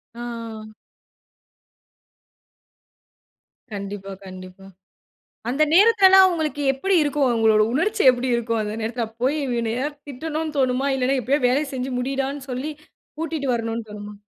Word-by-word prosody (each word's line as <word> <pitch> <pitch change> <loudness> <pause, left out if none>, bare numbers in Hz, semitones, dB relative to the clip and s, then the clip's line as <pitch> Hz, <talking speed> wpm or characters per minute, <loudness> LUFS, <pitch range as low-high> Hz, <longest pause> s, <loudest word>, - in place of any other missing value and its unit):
ஆ. 230 -2 -7 3.0
கண்டிப்பா, 200 -1 -6
கண்டிப்பா. 185 0 -11 0.8
அந்த 270 +5 +1
நேரத்துல்லாம் 385 -1 +7
அவங்களுக்கு 315 -5 -1
எப்டி 375 +9 0
இருக்கும்? 290 -1 +1
அவங்களுடைய 220 -2 +3
உணர்ச்சி 415 +9 +1
எப்டி 250 +1 -2
இருக்கும்? 230 -1 -1
அந்த 210 0 -4
நேரத்துல 230 +1 -2 0.2
போய் 270 +4 +2
இவனையாவது 245 +4 -2
திட்டனும்னு 310 +3 -4
தோணுமா? 260 +1 +1
இல்லைன்னா 265 +1 +1
எப்டியாவது 265 +2 +1
வேல 270 +5 +1
செஞ்சு 260 0 -3
முடிடான்னு 270 +2 -2
சொல்லி, 255 +5 -3 0.5
கூட்டிட்டு 315 -3 -3
வரனும்னு 230 -1 -3
தோணுமா? 210 0 -8
255 Hz, 115 wpm, -22 LUFS, 225-295 Hz, 3.0 s, நேரத்துல்லாம்